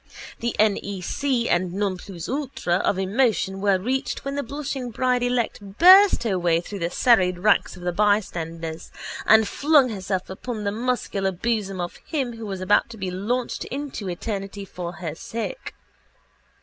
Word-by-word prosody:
The 235 Hz, 0 st, -2 dB
nec 215 Hz, +5 st, 0 dB
and 175 Hz, 0 st, +1 dB
non 200 Hz, -1 st, 0 dB
plus 180 Hz, -2 st, -8 dB
ultra 265 Hz, -10 st, -1 dB
of 190 Hz, -, 0 dB
emotion 195 Hz, -1 st, +1 dB
were 200 Hz, -2 st, +3 dB
reached 255 Hz, +8 st, -2 dB
when 275 Hz, -, -2 dB
the 285 Hz, -, -1 dB
blushing 275 Hz, -1 st, -4 dB
bride 250 Hz, +2 st, +1 dB
elect 245 Hz, -1 st, 0 dB, 0.2 s
burst 375 Hz, -3 st, +8 dB
her 195 Hz, -5 st, 0 dB
way 170 Hz, -1 st, +2 dB
through 195 Hz, +3 st, -7 dB
the 170 Hz, -1 st, -1 dB
serried 185 Hz, -3 st, +3 dB
ranks 205 Hz, +2 st, +2 dB
of 180 Hz, -, -11 dB
the 175 Hz, -, 0 dB
bystanders 170 Hz, -5 st, -1 dB, 0.4 s
and 220 Hz, -1 st, +6 dB
flung 285 Hz, +3 st, +4 dB
herself 190 Hz, -3 st, -3 dB
upon 215 Hz, +3 st, -5 dB
the 200 Hz, -, 0 dB
muscular 215 Hz, -4 st, -1 dB
bosom 195 Hz, 0 st, -2 dB
of 175 Hz, 0 st, -4 dB
him 265 Hz, -7 st, -3 dB
who 225 Hz, -1 st, -6 dB
was 190 Hz, -2 st, -5 dB
about 185 Hz, +5 st, +3 dB
to 230 Hz, -, -10 dB
be 190 Hz, -3 st, -3 dB
launched 235 Hz, +7 st, -2 dB
into 270 Hz, -7 st, -5 dB
eternity 195 Hz, +2 st, -4 dB
for 175 Hz, -2 st, -6 dB
her 170 Hz, -6 st, -5 dB
sake. 230 Hz, -, -6 dB
205 Hz, 160 wpm, -24 LUFS, 185-245 Hz, 0.4 s, burst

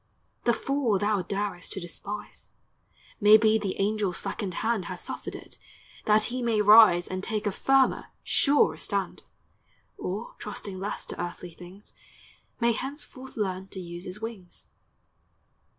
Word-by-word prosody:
The 240 Hz, -, +4 dB
fall 270 Hz, -5 st, 0 dB
thou 205 Hz, 0 st, +1 dB
darest 195 Hz, -1 st, -3 dB
to -, -, -4 dB
despise, 200 Hz, +4 st, -7 dB, 0.4 s
— -, -, -29 dB
May 210 Hz, +1 st, +9 dB
be 220 Hz, 0 st, +3 dB
the 200 Hz, -3 st, -3 dB
angel's 200 Hz, -2 st, 0 dB
slackened 190 Hz, -6 st, -3 dB
hand 225 Hz, -5 st, +1 dB
Has 180 Hz, 0 st, -6 dB
suffered -, -, -5 dB
it, -, -, -11 dB, 0.5 s
that 215 Hz, 0 st, +4 dB
he 255 Hz, -, -2 dB
may 230 Hz, -3 st, +1 dB
rise 210 Hz, -4 st, +7 dB
And 185 Hz, 0 st, -4 dB
take 215 Hz, 0 st, -2 dB
a 205 Hz, -, +1 dB
firmer, 270 Hz, +6 st, +2 dB, 0.2 s
surer 285 Hz, 0 st, +3 dB
stand; -, -, -3 dB, 0.8 s
Or, 210 Hz, -, -4 dB
trusting 200 Hz, -2 st, -6 dB
less 200 Hz, +2 st, -4 dB
to -, -, -6 dB
earthly 175 Hz, 0 st, -6 dB
things, 180 Hz, +4 st, -14 dB, 0.7 s
May 235 Hz, 0 st, +3 dB
henceforth 265 Hz, +1 st, -6 dB
learn 190 Hz, -2 st, -2 dB
to 190 Hz, -, -8 dB
use 175 Hz, 0 st, -8 dB
his 185 Hz, +3 st, -7 dB
wings. 220 Hz, -6 st, -8 dB
205 Hz, 150 wpm, -27 LUFS, 185-225 Hz, 0.8 s, May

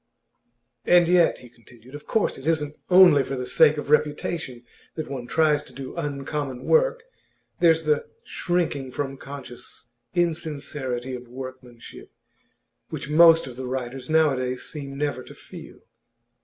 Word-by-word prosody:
'And 175 Hz, -1 st, +5 dB
yet,' 175 Hz, -1 st, +4 dB
he 125 Hz, -, -13 dB
continued, 120 Hz, +1 st, -19 dB
'of 145 Hz, 0 st, -10 dB
course 220 Hz, -, 0 dB
it 135 Hz, -, -8 dB
isn't 150 Hz, -2 st, 0 dB
only 180 Hz, -6 st, +7 dB
for 135 Hz, -, -4 dB
the 125 Hz, -1 st, -4 dB
sake 155 Hz, +3 st, +4 dB
of 150 Hz, -1 st, -5 dB
reputation 150 Hz, -4 st, 0 dB, 0.3 s
that 155 Hz, -, -4 dB
one 125 Hz, -3 st, -5 dB
tries 155 Hz, -1 st, +2 dB
to 130 Hz, -, -16 dB
do 135 Hz, +1 st, -8 dB
uncommon 145 Hz, -4 st, -4 dB
work. -, -, +2 dB, 0.6 s
There's 165 Hz, -2 st, +4 dB
the 150 Hz, -1 st, 0 dB, 0.2 s
shrinking 160 Hz, -7 st, -2 dB
from 135 Hz, -1 st, -4 dB
conscious 125 Hz, -4 st, -10 dB, 0.3 s
insincerity 150 Hz, -7 st, -2 dB
of 125 Hz, -1 st, -7 dB
workmanship 130 Hz, -1 st, -10 dB, 0.8 s
which 150 Hz, -2 st, -6 dB
most 165 Hz, +1 st, +7 dB
of 125 Hz, -2 st, -10 dB
the 130 Hz, -1 st, -5 dB
writers 130 Hz, 0 st, -5 dB
nowadays 135 Hz, -5 st, +1 dB
seem 140 Hz, -3 st, -7 dB
never 145 Hz, -3 st, -2 dB
to -, -, -13 dB
feel. -, -, -12 dB
145 Hz, 140 wpm, -24 LUFS, 130-160 Hz, 0.8 s, only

